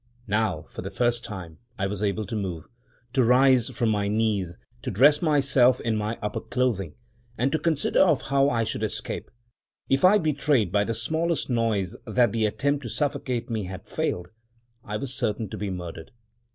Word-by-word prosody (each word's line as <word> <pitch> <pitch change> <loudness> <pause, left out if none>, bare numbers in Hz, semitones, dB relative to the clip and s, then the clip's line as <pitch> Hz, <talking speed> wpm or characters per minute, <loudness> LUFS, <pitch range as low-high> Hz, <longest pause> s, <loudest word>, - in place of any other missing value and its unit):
Now, 105 -7 0
for - - -9
the 95 - -5
first 120 +4 0
time, 90 -6 -8 0.2
I 95 - -1
was 100 +1 -3
able 105 +1 0
to 105 - -5
move 90 -6 -4 0.2
— 120 0 -36
to 130 - +3
rise 125 0 +5
from 120 -2 0
my 105 -2 +1
knees 105 -4 0
— - - -33
to - - -4
dress 145 +8 +5
myself 140 -5 +4
in 115 -1 -1
my 105 +2 -2
upper 105 - -2
clothing 115 -10 -1 0.2
— 120 0 -33
and 130 +3 +1
to 160 - +1
consider 155 -2 +1
of 165 -7 +4
how 140 0 +3
I 115 -4 +1
should 110 - -3
escape. 110 -2 -4 0.6
If 135 - +2
I 190 +3 +7
betrayed 145 - +1
by 100 +1 +2
the 115 - -2
smallest 160 +6 -1
noise 110 -6 0
that 125 -1 +3
the 110 -1 +1
attempt 140 +6 0
to 120 - -6
suffocate 125 -3 -2
me 110 -3 -2
had 95 0 -8
failed, 90 0 -2 0.5
I 105 +1 -4
was 130 +3 -3
certain 110 -4 -2
to 110 - -6
be 105 0 -2
murdered. 90 0 -6
115 Hz, 195 wpm, -26 LUFS, 100-135 Hz, 0.6 s, I